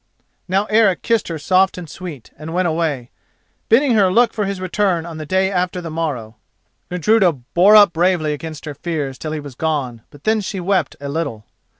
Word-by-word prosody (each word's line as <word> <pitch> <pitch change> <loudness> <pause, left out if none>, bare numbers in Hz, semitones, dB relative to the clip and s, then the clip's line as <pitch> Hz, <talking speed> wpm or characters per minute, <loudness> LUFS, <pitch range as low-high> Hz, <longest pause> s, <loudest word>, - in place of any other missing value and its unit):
Now 190 +3 +1
Eric 215 -4 +2
kissed 230 -2 +1
her 165 - -4
soft 185 +6 +2
and 175 -2 -7
sweet, 155 -6 -9
and 160 +2 -7
went 185 0 +2
away, 155 -7 -2 0.6
bidding 255 +3 +4
her 200 -4 +4
look 235 +4 +3
for 210 -3 -1
his 195 -1 -3
return 185 -2 0
on 165 -2 -8
the 155 - -7
day 190 +2 +1
after 180 -1 -1
the 170 -2 -6
morrow. 140 -9 -4 0.5
Gudruda 180 +1 +3
bore 175 - +3
up 205 -4 +7
bravely 170 -3 +1
against 155 0 -7
her 150 - -5
fears 145 -3 -4
till 155 - -5
he 155 - -3
was 145 -2 -9
gone, 135 -5 -2
but 145 -1 -17
then 220 0 +2
she 195 0 -4
wept 180 -4 0
a 140 - -6
little. 140 -8 -4
170 Hz, 200 wpm, -19 LUFS, 150-190 Hz, 0.6 s, up